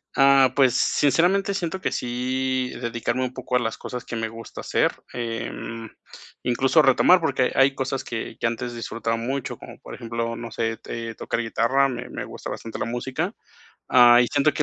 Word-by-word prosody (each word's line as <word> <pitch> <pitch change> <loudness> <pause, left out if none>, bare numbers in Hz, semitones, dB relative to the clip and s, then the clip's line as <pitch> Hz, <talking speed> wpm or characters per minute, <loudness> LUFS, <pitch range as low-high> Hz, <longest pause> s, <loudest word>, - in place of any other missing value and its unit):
Ah, 135 -2 +6
pues, 130 -3 +5
sinceramente 180 +8 +2
siento 185 -1 -3
que - - -2
sí 130 +1 -1
dedicarme 120 +2 -1
un 130 0 -3
poco 125 - -3
a - - +5
las 115 -1 -3
cosas 125 -1 -6
que 115 - -5
me 115 0 -1
gusta 115 0 -10
hacer, - - +1 0.2
em, 115 -1 -5 0.6
incluso 135 +5 +3
retomar, 160 +6 +5
porque 135 -5 +1
hay 135 0 +5
cosas 135 0 -3
que 115 -1 -5
que - - -3
antes 120 +1 -2
disfrutaba 115 0 -2
mucho, 130 +3 -3
como - - -12
por - - -9
ejemplo, 115 0 -3
no 115 -1 -7
sé 115 0 -1
t 115 0 -6
eh, - - -13
tocar - - -3
guitarra, 120 +4 +2
me 125 -1 -5
me - - -5
gusta - - -8
bastante 115 - -6
la - - -2
música, 130 - -3 0.6
ah, 120 -1 +7
y 120 - 0
siento 145 +2 +2
que 150 - +1
125 Hz, 190 wpm, -24 LUFS, 115-135 Hz, 0.6 s, ah